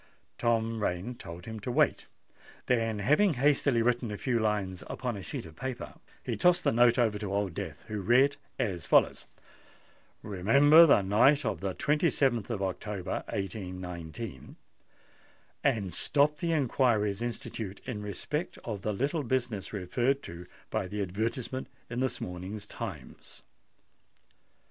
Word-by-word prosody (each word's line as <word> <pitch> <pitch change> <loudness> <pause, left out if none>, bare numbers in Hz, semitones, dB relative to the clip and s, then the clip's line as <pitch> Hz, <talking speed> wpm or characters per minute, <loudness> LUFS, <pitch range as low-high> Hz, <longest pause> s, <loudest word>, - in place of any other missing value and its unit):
Tom 115 -1 +1
Rain 95 +4 -1
told 85 -6 -10
him 110 -1 -6
to 115 +4 -4
wait; - - +2 0.6
then, 115 -3 +1
having 150 - +3
hastily 135 -2 +3
written 120 -1 +1
a 105 - -4
few 120 0 0
lines 100 -4 -1
upon 125 -3 -3
a 100 - -6
sheet 90 - -5
of 80 -1 -12
paper, 130 -1 -5 0.3
he - - -2
tossed 180 0 +4
the - - +3
note 120 +1 +5
over 110 -4 +2
to 100 -2 -4
Old 100 -2 -1
Death, 85 -6 -6
who 105 -2 -3
read 130 +8 +4 0.2
as 90 -5 -2
follows:— - - +3 1.0
"Remember 140 - +6
the 120 -9 +5
night 125 +9 +4
of 110 -3 -1
the 95 -2 -3
27th 140 - +1
of 105 -5 -2
October, 95 0 -3
1819;—and 95 - -6
stop 145 - +2
the 170 +2 -1
inquiries 120 -8 +2
instituted 110 -4 -5
in 115 -5 -4
respect 105 - -3
to 110 -3 -3
the 105 - -1
little 140 - 0
business 120 -6 -2
referred 120 +8 0
to 85 +1 -9 0.2
by - - -1
the 105 +1 -2
advertisement 115 +7 -3 0.2
in 120 - -2
this 130 -1 -1
morning's 95 +4 -6
Times." 95 - -9
110 Hz, 140 wpm, -30 LUFS, 95-130 Hz, 1.0 s, Remember